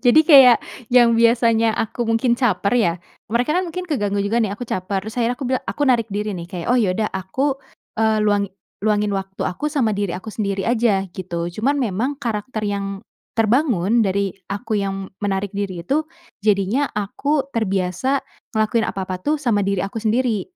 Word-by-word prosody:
Jadi 245 +6 +7
kayak 265 -6 +8 0.3
yang 240 -1 +5
biasanya 230 -1 +3
aku 230 +2 -2
mungkin 230 +2 +2
caper 205 -5 +1
ya, 195 -8 +3 0.4
mereka 235 +5 0
kan 370 - -1
mungkin 365 +2 -5
keganggu 205 - -1
juga 225 +4 +1
nih 205 -3 0
aku 245 - -5
caper, 190 -2 -2
terus 220 +3 -6
akhirnya 235 +1 +1
aku 280 - -6
bilang 260 - 0
aku 290 - -2
narik 240 -4 +2
diri 210 +1 -2
nih, 170 - -7
kayak, 175 -2 -6
"Oh 250 - +4
ya 195 -6 +2
udah 215 -1 0
aku, 260 +9 -1 0.4
eee, 220 -1 +3
luangi 205 -1 +2 0.3
luangin 210 0 +1
waktu 195 -1 -4
aku 185 +12 -2
sama 275 -7 +1
diri 200 -3 -2
aku 215 +4 -8
sendiri 200 -2 -2
aja," 225 -4 +2
gitu. 170 -2 -4
Cuman 280 +6 +2
memang 235 +5 -1
karakter 225 -3 -3
yang 200 -1 -3 0.3
terbangun 230 - +2
dari 200 -1 0 0.2
aku 215 +2 -3
yang 195 -1 -3
menarik 200 -1 -1
diri 190 -4 -3
itu, 280 - +1 0.4
jadinya 210 +7 +1
aku 270 +8 -1
terbiasa 195 +4 0 0.4
ngelakuin 220 +2 +2
apa-apa 185 -1 -4
tuh 300 - +1
sama 230 -8 +1
diri 195 -2 0
aku 200 +3 -4
sendiri, 225 -1 +1
215 Hz, 180 wpm, -21 LUFS, 195-245 Hz, 0.4 s, kayak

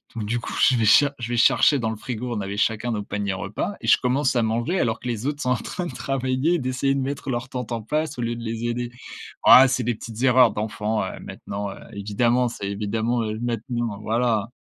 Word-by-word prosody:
Donc 110 - -3
du 120 +3 -1
coup - - -6
je 130 - +5
vais 115 -2 +1
cha 145 +6 +5
je 120 -1 -5
vais 120 - -1
chercher 140 +5 +5
dans 110 -1 -1
le - - -4
frigo, 120 +2 -4
on 105 - -2
avait 100 +1 -5
chacun 115 +3 0
nos 105 -2 -2
paniers 100 -1 -3
repas 100 - -4
et - - -7
je - - +6
commence 130 +1 +1
à 120 - +3
manger 120 +12 0
alors 115 -2 0
que 125 - -7
les 115 0 -3
autres 145 0 -3
sont 125 - 0
en - - +4
train 180 +8 -5
de 135 - -6
travailler, 130 +6 0
d'essayer 130 +1 0
de - - 0
mettre 140 +1 -4
leurs 120 0 -2
tentes 125 -3 -5
en 115 -1 -2
place, 150 +3 -2
au - - -3
lieu 120 0 -2
de 115 - -8
les 115 +1 -4
aider. 120 0 -2 0.5
Oh, 130 - +10
c'est 130 -1 0
des 120 -1 0
petites 115 +1 -8
erreurs 125 -3 +6
d'enfants, 105 +1 -2
heu, - - -7
maintenant, 100 0 -6
heu, - - -10 0.2
évidemment, 115 +5 +1
c'est 100 -4 -5
évidemment, 110 +4 -1
heu, 110 0 -4
maintenant, 120 -2 -3
voilà. 115 -1 0
120 Hz, 240 wpm, -23 LUFS, 110-125 Hz, 0.5 s, Oh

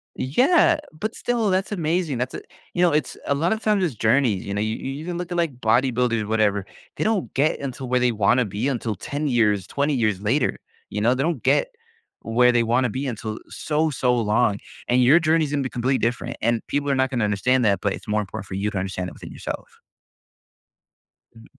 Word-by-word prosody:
Yeah, 300 - +3 0.2
but 215 +2 -3
still, 235 -4 0
that's 190 +2 0
amazing, 165 -5 -1
that's, 125 +1 -2
eh - - -4 0.3
you 175 - 0
know, 175 - +5
it's 150 -4 -1
a 140 - +2
lot 165 +8 +1
of 220 - -4
times, 210 -3 +2
it's 160 -8 0
journeys, 110 -2 +2
you 100 - -4
know? 100 - -1
You 110 +1 -1
you 140 +4 -6
can 175 -1 -3
look 180 0 -5
at, 175 - -2
like, 160 -7 0
bodybuilders, 120 -1 +2
whatever, 105 -3 +1 0.3
they - - -2
don't 215 -4 0
get 145 +4 +1
until 135 -2 -5
where 125 0 +2
they 125 -1 +3
wanna 115 +3 +2
be 105 +6 -2
until 115 -5 -2
10 145 +9 -4
years, 105 -7 +2
20 145 +1 0
years 110 -6 0
later, 120 +7 +1 0.3
you 105 - -3
know? 120 +3 +4
They 130 +1 -1
don't 160 -7 -1
get - - +3 0.6
where 125 +2 +4
they 120 -1 +3
wanna 120 +2 +2
be 135 +5 -3
until 110 -3 -4
so, 155 +1 0
so 125 -3 +1
long, 105 -1 +2 0.3
and 125 +1 +3
your 140 +7 +6
journey's 160 -2 +2
gonna 145 -2 0
be 130 - -3
completely 130 +2 0
different, 120 +1 -2
and 115 0 0
people 145 0 -1
are 135 - +2
not 130 0 +1
gonna 120 -4 0
understand 125 +5 +1
that, 100 -2 +3
but 100 -2 0
it's - - -9
more 105 0 +1
important 95 0 -7
for 95 - -6
you 105 +2 -1
to 95 - -4
understand 95 -1 -3
it - - -13
within - - -11
yourself. - - -7 1.6
Um 115 - -15
125 Hz, 220 wpm, -23 LUFS, 110-150 Hz, 1.6 s, your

